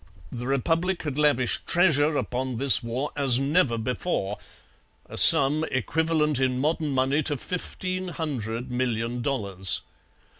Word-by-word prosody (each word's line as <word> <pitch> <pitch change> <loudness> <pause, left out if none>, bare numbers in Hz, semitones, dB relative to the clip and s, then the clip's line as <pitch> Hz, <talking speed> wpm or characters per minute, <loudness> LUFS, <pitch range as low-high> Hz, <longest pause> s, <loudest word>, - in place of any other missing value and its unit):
The 120 0 -6
Republic 165 +7 -1
had 150 -2 -4
lavished 140 -5 +1
treasure 155 -4 +3
upon 125 +1 -4
this 135 +1 +5
war 125 +4 -4
as 135 -4 +3
never 135 -2 +1
before 110 - -3 0.7
a - - -11
sum 145 +3 +6
equivalent 155 +1 -1
in 130 -1 0
modern 155 +3 -1
money 135 +2 0
to 145 -1 -2
fifteen 185 +4 -5
hundred 125 -9 -5
million 120 -1 -3
dollars. 100 -8 +1
135 Hz, 125 wpm, -24 LUFS, 125-155 Hz, 0.7 s, sum